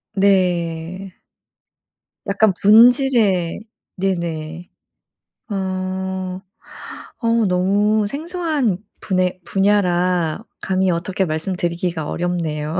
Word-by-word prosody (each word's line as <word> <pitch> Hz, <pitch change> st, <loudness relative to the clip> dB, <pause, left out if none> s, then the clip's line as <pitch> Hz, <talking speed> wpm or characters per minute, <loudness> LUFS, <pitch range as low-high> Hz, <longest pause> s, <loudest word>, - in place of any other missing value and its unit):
네. 180 Hz, -2 st, 0 dB, 1.1 s
약간 200 Hz, 0 st, +3 dB
본질의 220 Hz, -5 st, +4 dB, 0.4 s
네네. 170 Hz, -3 st, -3 dB, 0.8 s
어. 190 Hz, -1 st, -3 dB, 0.8 s
어 230 Hz, -1 st, +2 dB
너무 200 Hz, +4 st, +2 dB
생소한 305 Hz, -, -1 dB, 0.2 s
분해 185 Hz, -1 st, 0 dB
분야라 180 Hz, -3 st, +1 dB, 0.2 s
감히 190 Hz, -1 st, +1 dB
어떻게 175 Hz, +3 st, -1 dB
말씀드리기가 170 Hz, 0 st, -2 dB
어렵네요. 165 Hz, -2 st, -2 dB
185 Hz, 165 characters per minute, -20 LUFS, 175-205 Hz, 1.1 s, 본질의